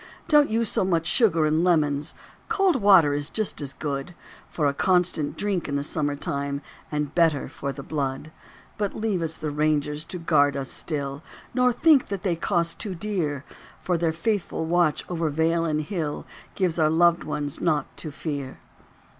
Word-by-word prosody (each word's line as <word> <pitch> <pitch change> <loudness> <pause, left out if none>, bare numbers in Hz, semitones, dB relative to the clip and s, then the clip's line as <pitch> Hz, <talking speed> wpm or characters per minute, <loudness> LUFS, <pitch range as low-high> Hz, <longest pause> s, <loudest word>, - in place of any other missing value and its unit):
Don't 295 -2 +5
use 225 +1 +1
so - - +2
much 170 -3 +1
sugar 170 -10 +3
and 155 +2 +2
lemons; 150 -4 +1 0.3
Cold 390 -8 +3
water 190 - +6
is 145 0 -1
just 215 -7 -2
as 135 -2 -5
good 140 +3 -4 0.3
For 155 - -1
a 140 - +2
constant 170 -3 +1
drink 200 -6 -1
in 140 - -1
the 140 - 0
summer 145 -1 -1
time 140 0 -3 0.3
And 150 -1 -2
better 165 -5 +2
for 140 - -5
the 140 0 -8
blood. 140 0 -3 0.5
But 205 -2 -1
leave 215 -5 -1
us 160 -1 -2
the 150 - -3
Rangers 150 0 0
to 180 - -6
guard 145 -4 +2
us 135 -1 -4
still, 140 -2 -3 0.3
Nor 250 -1 +3
think 285 +2 +4
that 200 -1 -4
they 180 -4 +1
cost 170 -1 -1
too 200 -4 -4
dear; 165 -8 -2 0.3
For 180 - -1
their 165 -1 +1
faithful 170 -1 -2
watch 170 -2 +1
over 165 -3 -1
vale 165 +3 +1
and 155 -1 0
hill 155 -2 -4 0.3
Gives 180 -4 0
our 155 -1 +4
loved 170 +1 +3
ones 145 -2 -4
naught 150 -5 +1
to 155 - -5
fear. 140 -2 -5
160 Hz, 180 wpm, -25 LUFS, 145-180 Hz, 0.5 s, water